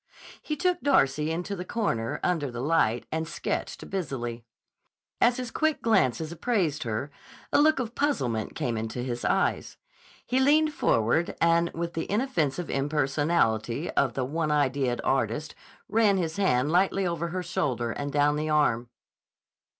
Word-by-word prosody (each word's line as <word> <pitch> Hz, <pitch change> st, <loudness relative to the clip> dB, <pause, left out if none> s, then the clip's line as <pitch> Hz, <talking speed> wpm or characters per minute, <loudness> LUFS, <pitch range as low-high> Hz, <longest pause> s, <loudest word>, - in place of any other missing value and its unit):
He 305 Hz, -, -3 dB
took 360 Hz, +2 st, +1 dB
Darcy 150 Hz, -, +2 dB
into 175 Hz, +5 st, -3 dB
the 180 Hz, -, -5 dB
corner, 180 Hz, -, -2 dB
under 160 Hz, -6 st, 0 dB
the 120 Hz, -1 st, -6 dB
light, 130 Hz, -5 st, +1 dB
and 160 Hz, 0 st, -2 dB
sketched -, -, -4 dB
busily. 125 Hz, -11 st, -4 dB, 0.8 s
As 240 Hz, +1 st, +4 dB
his 250 Hz, -2 st, -4 dB
quick 315 Hz, -1 st, 0 dB
glances 160 Hz, -, +2 dB
appraised 170 Hz, -, 0 dB
her, 115 Hz, +4 st, -3 dB, 0.4 s
a -, -, +5 dB
look 310 Hz, 0 st, +4 dB
of 240 Hz, -3 st, -3 dB
puzzlement 125 Hz, -, -1 dB
came 120 Hz, -2 st, -2 dB
into 110 Hz, +3 st, -4 dB
his 120 Hz, -2 st, -4 dB
eyes. -, -, 0 dB, 0.5 s
He 255 Hz, -, +1 dB
leaned 305 Hz, +3 st, +4 dB
forward, 120 Hz, -, +1 dB
and 170 Hz, 0 st, +3 dB
with 170 Hz, +1 st, -3 dB
the 165 Hz, -, -4 dB
inoffensive 180 Hz, -, 0 dB
impersonality 140 Hz, -2 st, 0 dB
of 135 Hz, -3 st, +1 dB
the 130 Hz, -, -1 dB
one 155 Hz, +3 st, -2 dB
ideaed 135 Hz, -4 st, +1 dB
artist 135 Hz, +3 st, 0 dB, 0.3 s
ran 210 Hz, -2 st, +3 dB
his 165 Hz, -2 st, -2 dB
hand 145 Hz, -8 st, +2 dB
lightly 190 Hz, +2 st, +2 dB
over 170 Hz, -1 st, -1 dB
her 180 Hz, +2 st, -3 dB
shoulder 120 Hz, -8 st, -1 dB
and 145 Hz, +3 st, -4 dB
down 145 Hz, +1 st, +2 dB
the 155 Hz, +1 st, -2 dB
arm. 125 Hz, -6 st, +2 dB
155 Hz, 150 wpm, -27 LUFS, 130-195 Hz, 0.8 s, a